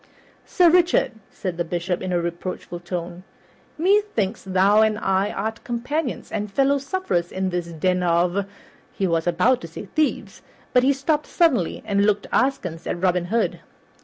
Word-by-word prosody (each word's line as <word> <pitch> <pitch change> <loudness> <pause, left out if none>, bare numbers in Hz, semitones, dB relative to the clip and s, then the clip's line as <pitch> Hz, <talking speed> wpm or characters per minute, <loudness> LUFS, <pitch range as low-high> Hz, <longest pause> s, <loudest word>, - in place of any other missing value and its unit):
"Sir 360 -2 +4
Richard," 355 0 +3 0.2
said 180 -3 -5
the 175 - 0
Bishop 175 +1 -2
in 185 - -3
a 175 - +2
reproachful 175 +1 -5
tone, 175 0 -6 0.5
"methinks 350 - +1
thou 195 +3 +4
and 215 -1 +2
I 195 -1 +1
are 215 +1 -2
companions 245 +7 -4
and 210 0 -3
fellow 275 +5 +2
sufferers 275 - -2
in 190 0 -2
this 175 -1 -2
den 180 +2 0
of 175 +3 +1 0.2
" - - -30
He 195 - +1
was 165 -1 0
about 185 +9 +3
to 165 - -7
say 165 +5 -8
"thieves," 305 +9 -1 0.3
but 250 - +6
he 265 +2 +4
stopped 295 +2 0
suddenly 275 - +1
and 200 -1 +1
looked 205 0 +2
askance 180 -11 0
at - - -2
Robin 180 -1 +1
Hood. 225 +6 0
195 Hz, 165 wpm, -23 LUFS, 175-255 Hz, 0.5 s, but